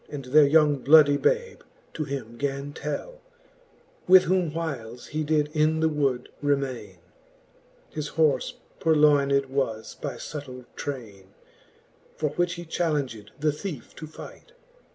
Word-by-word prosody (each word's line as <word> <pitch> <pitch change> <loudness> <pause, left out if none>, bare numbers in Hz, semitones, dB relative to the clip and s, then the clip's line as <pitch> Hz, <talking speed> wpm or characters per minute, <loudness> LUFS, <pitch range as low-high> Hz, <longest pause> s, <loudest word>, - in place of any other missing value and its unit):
And 140 -3 -7
their 145 +3 +6
young 150 -1 +4
bloodie 145 +1 +6
babe, 475 - 0 0.3
to 155 - -3
him 125 -5 -6
gan 140 +1 -3
tell - - -5 0.9
5 - - -15
With 185 0 +9
whom 180 -2 +1
whiles 130 -8 -5
he 155 0 -3
did 150 -1 +1
in 155 0 +2
the 160 0 +3
wood 140 -5 -1
remaine, 135 -9 -2 0.9
His 150 -1 -4
horfe 155 -3 +1 0.3
purloyned 145 -3 +4
was 130 -5 -3
by 140 -4 -4
fubtill 125 -1 -8
traine; 105 -9 -7 0.8
For 150 - -1
which 175 -1 0
he 175 - -8
chalenged 145 -11 -2
the 150 +1 +2
thiefe 150 -3 -7
to 155 - -7
fight. 160 - -12
145 Hz, 135 wpm, -26 LUFS, 135-155 Hz, 0.9 s, With